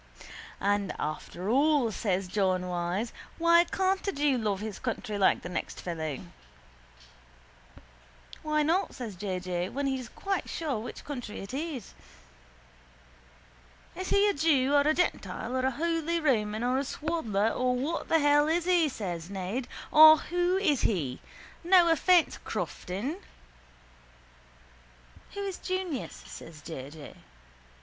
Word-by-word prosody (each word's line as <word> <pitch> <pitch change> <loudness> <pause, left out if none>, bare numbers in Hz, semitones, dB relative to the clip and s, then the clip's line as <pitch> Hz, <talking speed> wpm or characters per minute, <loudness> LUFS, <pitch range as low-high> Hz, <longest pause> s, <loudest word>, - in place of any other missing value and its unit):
—And 200 0 0
after 165 +4 -5
all, 275 0 +3
says 195 -3 -1
John 185 -1 +1
Wyse, 180 +5 -2 0.2
why 340 +1 +5
can't 380 +2 0
a - - +2
jew 290 -4 +1
love 210 -5 -1
his 215 -1 -6
country 225 -3 -3
like 195 -2 +3
the - - -5
next 180 - -4
fellow? 160 -5 -4 2.2
—Why 305 -1 +1
not? 340 +6 +1
says 230 -6 -6
J. 185 0 -3
J., 180 0 -3
when 280 +1 -3
he's 265 -3 -2
quite 390 -2 -3
sure 295 -9 -2
which 230 - -8
country 245 -7 -6
it 195 +4 -8
is. 280 - -5 2.0
—Is 370 0 -5
he 405 +1 +4
a 405 - +2
jew 280 -3 +2
or 285 - +6
a 300 +2 +3
gentile 230 - -1
or 260 0 +1
a - - +3
holy 330 +4 -1
Roman 220 -7 +1
or 250 +2 +1
a - - -1
swaddler 260 -9 -1
or 250 +1 0
what 285 +7 -3
the 325 - +5
hell 295 0 +4
is 330 +2 +1
he? 350 -4 +3
says 180 -8 -5
Ned. 200 +6 -3 0.2
Or 315 0 +10
who 355 +3 0
is 315 -9 +2
he? 145 - -1 0.4
No 350 -1 +6
offence, 340 +2 +3
Crofton. 215 - -4 2.2
—Who 405 - -3
is 390 -2 -4
Junius? 370 -8 -4
says 155 -2 -11
J. 140 -5 -7
J. 150 -1 -11
260 Hz, 140 wpm, -29 LUFS, 195-325 Hz, 2.2 s, Or